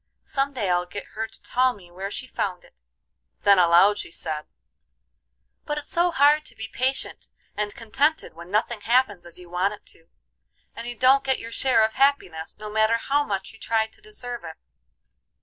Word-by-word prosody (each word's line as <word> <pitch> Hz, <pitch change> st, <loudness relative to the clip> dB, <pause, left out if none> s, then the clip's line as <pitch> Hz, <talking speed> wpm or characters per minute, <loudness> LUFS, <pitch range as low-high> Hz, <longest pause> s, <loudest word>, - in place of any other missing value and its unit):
Some 275 Hz, +1 st, -1 dB
day 225 Hz, -7 st, -2 dB
I'll 180 Hz, 0 st, +1 dB
get 200 Hz, +3 st, -7 dB
her 220 Hz, +1 st, -3 dB
to -, -, -15 dB
tell 255 Hz, +1 st, +2 dB
me 180 Hz, -6 st, -16 dB
where 190 Hz, +3 st, -5 dB
she 255 Hz, -, -5 dB
found 185 Hz, -7 st, -3 dB
it." -, -, -21 dB, 0.7 s
Then 200 Hz, -2 st, +6 dB
aloud 180 Hz, +4 st, +6 dB
she -, -, -5 dB
said: 155 Hz, -2 st, -5 dB, 1.2 s
"But 295 Hz, -, -3 dB
it's 295 Hz, -, -6 dB
so 345 Hz, +1 st, +3 dB
hard 300 Hz, -1 st, +4 dB
to -, -, -11 dB
be 220 Hz, -, -6 dB
patient 260 Hz, +4 st, -3 dB, 0.3 s
and 205 Hz, -1 st, -3 dB
contented 280 Hz, +8 st, 0 dB
when 170 Hz, +2 st, -11 dB
nothing 215 Hz, +2 st, 0 dB
happens 225 Hz, -6 st, +1 dB
as 170 Hz, -, -11 dB
you 180 Hz, -1 st, -12 dB
want 185 Hz, +4 st, 0 dB
it -, -, -25 dB
to, 165 Hz, -, -24 dB, 0.7 s
and 230 Hz, -, -6 dB
you 240 Hz, -, -4 dB
don't 260 Hz, +3 st, +5 dB
get 265 Hz, -1 st, +1 dB
your 230 Hz, -, -8 dB
share 250 Hz, -2 st, +3 dB
of 220 Hz, -, -3 dB
happiness, 265 Hz, -, +1 dB
no 215 Hz, -, -8 dB
matter 220 Hz, +2 st, +2 dB
how 285 Hz, +5 st, +1 dB
much 195 Hz, -5 st, -4 dB
you 220 Hz, -, -16 dB
try 225 Hz, -1 st, +1 dB
to 220 Hz, -, -19 dB
deserve 245 Hz, -, -6 dB
it." 160 Hz, -1 st, -8 dB
220 Hz, 195 wpm, -25 LUFS, 185-260 Hz, 1.2 s, Then